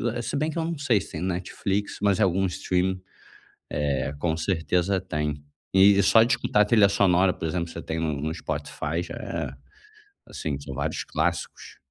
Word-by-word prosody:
é, 120 - -2
se 120 - -4
bem 150 +3 0
que - - -7
eu 165 - 0
não 170 -1 -3
sei 125 -7 +3
se - - -11
tem 80 - -5
no 90 - -1
Netflix. 95 +3 -2
Mas 100 -2 +2
algum 95 -2 +2
streaming, 90 +1 -1 0.7
eh, 70 -2 -1
com 80 +1 0
certeza 90 +2 0
tem. 75 -5 -3 0.3
E 100 +1 +6
só 110 +3 +6
de 120 +3 +2
escutar 105 - +2
a - - +3
trilha 105 -2 +5
sonora, 95 -2 +3
por - - -4
exemplo, 85 +1 -2
você 85 0 -7
tem 80 0 -3
no 80 -3 -1
no 80 +2 -2
Spotify, 80 +1 -3
já 85 - -7
é, - - -4 0.8
assim 70 -3 -4
são 70 -1 -7
vários 75 +3 -2
clássicos. - - -3
90 Hz, 190 wpm, -25 LUFS, 80-100 Hz, 0.8 s, E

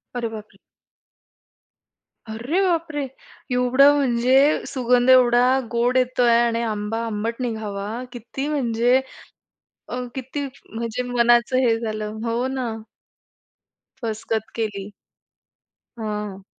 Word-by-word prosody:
अरे 235 -1 -1
बापरे! 215 -1 -10 1.7
अरे, 245 - -1
बापरे! 335 -5 0 0.5
एवढं 255 +3 +5
म्हणजे 255 -2 +2 0.3
सुगंध 250 -1 +2
एवढा 245 -2 +6 0.3
गोड 240 +2 +2
येतोय 250 -1 +3
आणि 230 0 0
आंबा 210 +1 -3
आंबट 225 +1 -3
निघावा 210 -4 -3 0.2
किती 250 +3 -5
म्हणजे. 250 -3 +2 0.9
अ, - - -4 0.2
किती 265 +2 -4 0.3
म्हणजे 230 +2 -3
मनाचं 240 +1 +3
हे 225 0 +3
झालं. 215 -2 -4
हो 235 +2 0
ना. 260 -2 -3 1.3
फसगत 220 0 -3
केली. 205 -3 -3 1.1
हां. 210 -3 -5
235 Hz, 100 wpm, -22 LUFS, 220-255 Hz, 1.7 s, एवढा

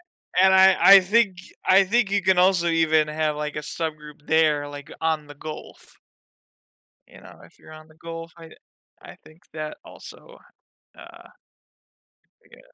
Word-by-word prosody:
a 185 - -1
and 190 0 +4
I 190 0 +5
I 195 0 +8
think 195 -1 0 0.3
I 190 +1 +4
think 215 0 0
you 200 0 0
can 190 0 +2
also, 180 -1 +2
even, 160 -2 +1
have, 155 -1 -2
like, 150 0 -6
a - - -3
subgroup 150 -1 -8
there, 150 -2 +1
like, 145 0 -11
on 160 -2 -2
The 145 - -13
Gulf. 155 +2 -11 1.1
You - - -18
know, - - -16
if - - -20
you're - - -17
on 155 0 -14
The 155 - -22
Gulf, 165 0 -10 0.9
think 155 +2 -20
that, 155 -1 -7
also, - - -14 0.6
uh - - -15 1.2
Yeah. - - -18
160 Hz, 150 wpm, -22 LUFS, 150-190 Hz, 1.2 s, I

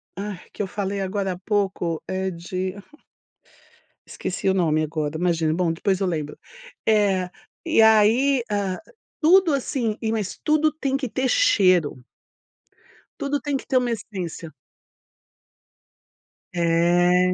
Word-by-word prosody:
ah, 200 0 -5 0.2
que - - -5
eu 195 - -1
falei 200 0 -3
agora 195 0 -2
há 180 - -6
pouco, 190 -5 -1
é 190 0 -2
de 185 +2 -4 1.3
esqueci 190 - -4
o 190 - +4
nome 155 -4 +2
agora, 155 0 -2
imagina, 165 -2 +1
bom 170 -1 0
depois 190 +3 0
eu 195 - 0
lembro. 150 -3 -4 0.5
É, 195 -4 +2 0.4
e 315 -8 +4
aí, 225 +5 +5
ah, 200 -3 -1 0.4
tudo 335 0 +5
assim 245 -5 -1 0.2
mas 210 -4 -3
tudo 310 0 +3
tem 275 -3 -2
que 265 -4 -2
ter 260 +4 -1
cheiro. 185 - +3 1.2
Tudo 285 +1 -1
tem 290 -2 -3
que - - -7
ter 260 - 0
uma 245 -1 +2
essência. 180 -7 -5 2.0
É. 175 +1 +3
190 Hz, 130 wpm, -23 LUFS, 175-230 Hz, 2.0 s, aí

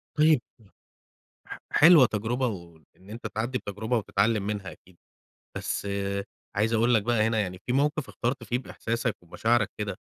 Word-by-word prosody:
طيب 155 -4 +5 1.1
ح - - -8
حلوة 160 -4 +8
تجربة 115 +4 -1
و 85 -6 -6 0.2
وإن 95 - -19
أنت 115 +3 -6
تعدّي 120 +4 -2
بتجربة 110 +3 -2
وتتعلم 105 0 +1
منها 100 -4 -4
أكيد. 90 +3 -18 0.6
بس - - -3 0.7
عايز 110 +3 +1
أقول 115 +2 +3
لك 110 -3 +3
بقى 115 -2 +2
هنا 115 -1 +1
يعني 90 -3 -3
في 125 - -1
موقف 145 +1 +1
اخترت 125 +3 -2
فيه 120 - -1
بإحساسك 115 -2 -3
ومشاعرك 100 +6 +1
كده 100 -3 -4
110 Hz, 155 wpm, -27 LUFS, 100-125 Hz, 1.1 s, حلوة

